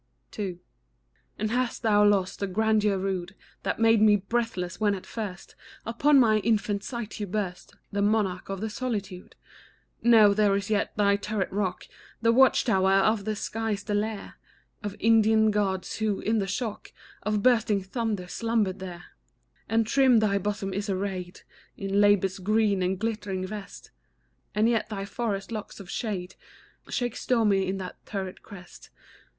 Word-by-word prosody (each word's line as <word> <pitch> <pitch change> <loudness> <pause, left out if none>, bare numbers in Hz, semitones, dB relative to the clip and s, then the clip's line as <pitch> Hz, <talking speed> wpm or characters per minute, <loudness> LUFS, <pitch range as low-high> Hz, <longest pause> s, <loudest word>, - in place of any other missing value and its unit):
II. 190 -4 -4 0.8
And 215 +1 -2
hast 250 0 -1
thou 210 -2 +4
lost 200 -3 +2
the 200 - -1
grandeur 210 0 +2
rude 190 -1 -3 0.3
That - - -2
made 225 -1 +4
me 215 -1 +6
breathless, 200 -3 -2
when 205 -2 +2
at 185 - -9
first 200 -5 -6 0.3
Upon 275 +5 +4
my 220 -4 +4
infant 205 -2 0
sight 235 -2 -6
you 205 - -3
burst, 185 -2 -4 0.2
The 200 - -1
monarch 205 -3 0
of 195 0 -4
the 220 - -2
solitude? 205 -6 -5 0.7
No; 220 -4 +6
there 205 -1 +3
is 200 +2 -3
yet 210 0 0
thy 200 -1 +3
turret 205 -1 -3
rock, 195 -2 -2 0.3
The 230 0 +3
watch 260 +2 +5
tower 190 -5 +3
of 200 +2 +3
the 215 0 -1
skies, 215 -1 -3
the 205 - -3
lair 210 0 -3 0.4
Of 205 -2 -5
Indian 220 -1 +4
Gods, 195 -3 -1
who, 215 -2 0
in 220 +1 +1
the 195 - -1
shock 215 +1 -4 0.3
Of 210 -1 -1
bursting 225 -5 +3
thunders, 200 -3 -3
slumbered 225 -5 0
there; 175 -2 -8 0.7
And 225 +1 +2
trim 260 +1 +4
thy 205 -2 +2
bosom 200 -1 -3
is 200 +2 -3
arrayed 185 -1 -3 0.4
In 195 +1 0
labour's 195 -2 +3
green 210 0 +2
and 185 +1 0
glittering 205 -3 -3
vest, 205 +1 -9 0.6
And 215 +2 +3
yet 230 -2 +1
thy 195 -2 -4
forest 200 -1 -3
locks 215 -2 -6
of 195 -2 -9
shade 190 -6 -3 0.6
Shake 245 -2 -2
stormy 205 -6 +1
on 195 - -2
that 185 -1 -8
turret 190 -3 -5
crest. 185 -4 -13
205 Hz, 160 wpm, -27 LUFS, 195-220 Hz, 0.8 s, me